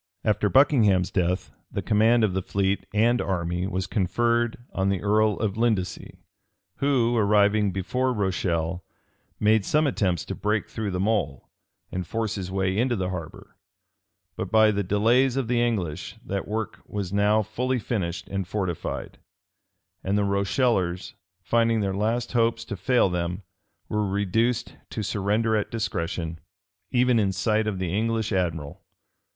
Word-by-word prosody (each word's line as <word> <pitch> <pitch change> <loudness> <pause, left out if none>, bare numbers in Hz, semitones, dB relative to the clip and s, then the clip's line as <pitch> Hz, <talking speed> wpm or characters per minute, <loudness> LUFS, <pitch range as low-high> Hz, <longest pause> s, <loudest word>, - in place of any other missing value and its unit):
After 105 -1 +1
Buckingham's 105 -9 +4
death, 90 0 0 0.2
the - - -3
command 110 +2 +4
of 105 -4 +2
the 95 - 0
fleet 95 +1 -1
and 120 +4 +3
army 90 -1 -1
was 95 -1 -2
conferred 115 +6 +1 0.2
on 95 0 0
the 100 -1 -1
earl 105 +1 +3
of 105 -2 -2
Lindesey; 110 -6 -1 0.6
who, 125 -4 +2
arriving 105 -1 +3
before 125 +8 -1
Rochelle, 90 -5 -1 0.6
made 110 0 +3
some 150 +8 +2
attempts 95 - 0
to - - -4
break 105 0 -1
through 110 -2 -4
the 90 -1 -2
mole, 95 - -1 0.4
and 90 -1 -4
force 110 0 -2
his 95 -3 -4
way 95 0 0
into 120 +3 +1
the 95 -3 -2
harbor: 85 -4 -7 0.8
but - - -4
by 110 -1 +5
the 100 -1 0
delays 115 +7 +3
of 135 -4 0
the 120 0 +1
English, 100 -10 -2
that 100 -1 -3
work 110 +1 -4
was 100 -2 -4
now 105 +2 +3
fully 125 +5 -1
finished 95 -7 -3
and 95 -2 -3
fortified; 95 -4 -4 0.8
and 100 +2 0
the 105 - +2
Rochellers, 100 -1 0 0.3
finding 115 +2 +2
their 100 -1 -1
last 110 +5 -1
hopes 115 -1 +1
to - - -5
fail 120 +5 +2
them, 90 +1 -3 0.4
were 105 -2 -1
reduced 110 +5 0
to 110 - -4
surrender 105 +3 0
at 105 - -1
discretion, 85 -7 -3 0.5
even 125 -1 +3
in 100 -3 +2
sight 110 +2 0
of 105 -3 -1
the 90 -1 -2
English 115 0 0
admiral. 80 -6 -2
105 Hz, 150 wpm, -25 LUFS, 95-115 Hz, 0.8 s, by